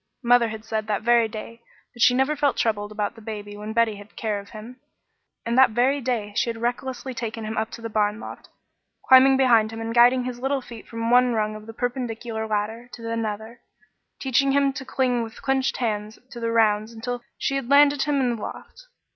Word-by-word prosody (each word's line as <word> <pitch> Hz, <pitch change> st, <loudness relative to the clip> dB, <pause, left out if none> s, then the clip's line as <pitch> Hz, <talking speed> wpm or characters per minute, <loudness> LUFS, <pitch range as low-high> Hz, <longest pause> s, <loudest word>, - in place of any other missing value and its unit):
Mother 240 Hz, -1 st, +5 dB
had 220 Hz, 0 st, -7 dB
said 220 Hz, -1 st, -3 dB
that 210 Hz, -1 st, -1 dB
very 235 Hz, -1 st, +4 dB
day 225 Hz, +2 st, -9 dB, 0.3 s
that 240 Hz, -, -10 dB
she 250 Hz, -, +6 dB
never 265 Hz, +4 st, +2 dB
felt 290 Hz, -2 st, +1 dB
troubled 205 Hz, -2 st, -1 dB
about 210 Hz, 0 st, -2 dB
the 225 Hz, -, -14 dB
baby 205 Hz, -2 st, -7 dB
when 210 Hz, +1 st, -6 dB
Betty 225 Hz, -2 st, +1 dB
had 205 Hz, +2 st, -14 dB
care 215 Hz, -2 st, -2 dB
of 200 Hz, 0 st, -12 dB
him, 230 Hz, +4 st, -11 dB, 0.7 s
and 235 Hz, 0 st, -1 dB
that 255 Hz, -4 st, +5 dB
very 270 Hz, +4 st, +3 dB
day 230 Hz, -5 st, -2 dB
she 235 Hz, -, +1 dB
had 230 Hz, -, -4 dB
recklessly 250 Hz, +2 st, -3 dB
taken 230 Hz, -2 st, -5 dB
him 220 Hz, +1 st, -4 dB
up 220 Hz, 0 st, -1 dB
into 230 Hz, 0 st, -11 dB
the -, -, -2 dB
barn 210 Hz, 0 st, 0 dB
loft, -, -, -10 dB, 0.6 s
climbing 265 Hz, +1 st, +7 dB
behind 230 Hz, -5 st, +4 dB
him 225 Hz, -, -7 dB
and 225 Hz, 0 st, -4 dB
guiding 245 Hz, +2 st, +5 dB
his 245 Hz, -1 st, -5 dB
little 270 Hz, +2 st, 0 dB
feet 235 Hz, -3 st, -11 dB
from 230 Hz, 0 st, -3 dB
one 250 Hz, 0 st, +5 dB
rung 215 Hz, -1 st, -1 dB
of 215 Hz, 0 st, -11 dB
the -, -, -7 dB
perpendicular 235 Hz, -2 st, -3 dB
ladder 220 Hz, +3 st, -3 dB
to 230 Hz, -1 st, -6 dB
another, 225 Hz, +1 st, -4 dB, 0.6 s
teaching 270 Hz, +1 st, +2 dB
him 280 Hz, -1 st, +2 dB
to 265 Hz, 0 st, -6 dB
cling 255 Hz, -3 st, 0 dB
with 225 Hz, -1 st, -8 dB
clenched 265 Hz, -1 st, 0 dB
hands 215 Hz, -3 st, -3 dB
to 240 Hz, -, -8 dB
the 230 Hz, 0 st, -2 dB
rounds 215 Hz, -1 st, +2 dB
until 240 Hz, +2 st, -5 dB, 0.2 s
she 275 Hz, -, -1 dB
had 270 Hz, -3 st, -3 dB
landed 285 Hz, 0 st, +5 dB
him 290 Hz, -1 st, +1 dB
in 245 Hz, -3 st, 0 dB
the -, -, -10 dB
loft. -, -, -9 dB
230 Hz, 215 wpm, -24 LUFS, 220-255 Hz, 0.7 s, climbing